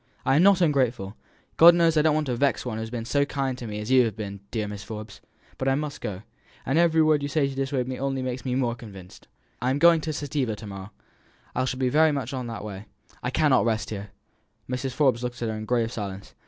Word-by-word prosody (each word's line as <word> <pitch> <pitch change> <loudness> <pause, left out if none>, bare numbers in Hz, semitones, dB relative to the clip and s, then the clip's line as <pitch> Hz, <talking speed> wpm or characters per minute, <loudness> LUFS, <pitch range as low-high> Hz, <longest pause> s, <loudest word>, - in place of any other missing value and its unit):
I 135 - +3
am - - +5
not 195 0 +5
ungrateful. 125 - +1 0.4
God 170 +1 +9
knows 165 -1 +3
I 155 - +5
don't 155 0 +3
want 155 0 0
to 125 -3 -1
vex 140 +2 +1
one 115 -3 -3
who - - -4
has 110 0 -5
been 115 -1 -5
so 140 +4 +2
kind 135 -2 -2
to 120 - -6
me 105 -1 -5
as 105 +4 -5
you 130 -2 +6
have 110 - -3
been, 100 -2 -6
dear 110 -3 -2
Mrs. 105 0 -7
Forbes; 110 0 -8 0.4
but 130 - -1
I 135 - +3
must 150 0 -4
go 100 -4 -5 0.4
and 135 +6 +2
every 165 -2 +4
word 155 -2 +3
you 145 - -3
say 140 0 +1
to 135 - -5
dissuade 135 -2 -1
me 130 -1 -4
only 135 -1 -2
makes 130 0 -4
me 125 -2 -2
more 125 -3 +1
convinced. 95 -6 -12 0.3
I 125 - +1
am 135 - +1
going 170 +1 +6
to 155 - -3
Civita 140 -6 -2
to 110 - -10
morrow. 100 0 -8 0.6
I 130 - 0
shall 130 0 -3
be 130 -1 +1
that 155 +4 +4
much 140 0 -4
on 130 -2 -4
the 115 -3 -6
way. 100 -1 -7 0.4
I 125 - -2
cannot 145 -1 +3
rest 115 -1 -1
here." 105 -1 -6 0.6
Mrs. 125 +1 -3
Forbes 130 -4 +2
looked 125 -1 -4
at 115 - -2
her 110 - -3
in 110 0 -6
grave 115 -1 0
silence. 100 -4 -6
125 Hz, 255 wpm, -25 LUFS, 110-145 Hz, 0.6 s, God